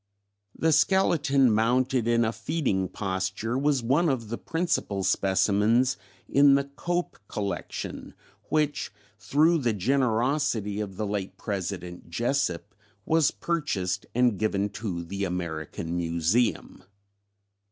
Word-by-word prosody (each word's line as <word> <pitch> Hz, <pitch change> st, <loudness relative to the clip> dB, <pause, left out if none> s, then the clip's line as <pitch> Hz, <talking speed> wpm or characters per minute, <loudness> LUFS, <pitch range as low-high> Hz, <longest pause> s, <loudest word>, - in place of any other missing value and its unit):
"The 160 Hz, -, +2 dB
skeleton 150 Hz, -, +3 dB
mounted 120 Hz, +2 st, +2 dB
in 115 Hz, 0 st, +3 dB
a 110 Hz, -, 0 dB
feeding 110 Hz, -, -1 dB
posture 95 Hz, +4 st, -2 dB
was 140 Hz, -1 st, +1 dB
one 150 Hz, +8 st, +2 dB
of 120 Hz, -6 st, -2 dB
the 115 Hz, -, -3 dB
principal 165 Hz, -, -1 dB
specimens 105 Hz, +7 st, +2 dB, 0.3 s
in 140 Hz, 0 st, +5 dB
the 140 Hz, -, +2 dB
Cope 175 Hz, +6 st, -3 dB
Collection, 100 Hz, -1 st, -5 dB, 0.3 s
which, 150 Hz, -2 st, 0 dB, 0.3 s
through 160 Hz, +7 st, +3 dB
the 120 Hz, -5 st, +1 dB
generosity 120 Hz, -1 st, 0 dB
of 100 Hz, -3 st, -5 dB
the 110 Hz, -, -1 dB
late 100 Hz, -2 st, -4 dB
President 90 Hz, -4 st, -5 dB
Jesup, 105 Hz, -2 st, -1 dB, 0.3 s
was 160 Hz, -3 st, +3 dB
purchased 100 Hz, -, -2 dB
and 125 Hz, -5 st, +3 dB
given 105 Hz, -2 st, 0 dB
to 100 Hz, -5 st, -4 dB
the 100 Hz, +4 st, -4 dB
American 85 Hz, -2 st, -4 dB
Museum. 85 Hz, +7 st, 0 dB
115 Hz, 115 wpm, -27 LUFS, 95-140 Hz, 0.3 s, in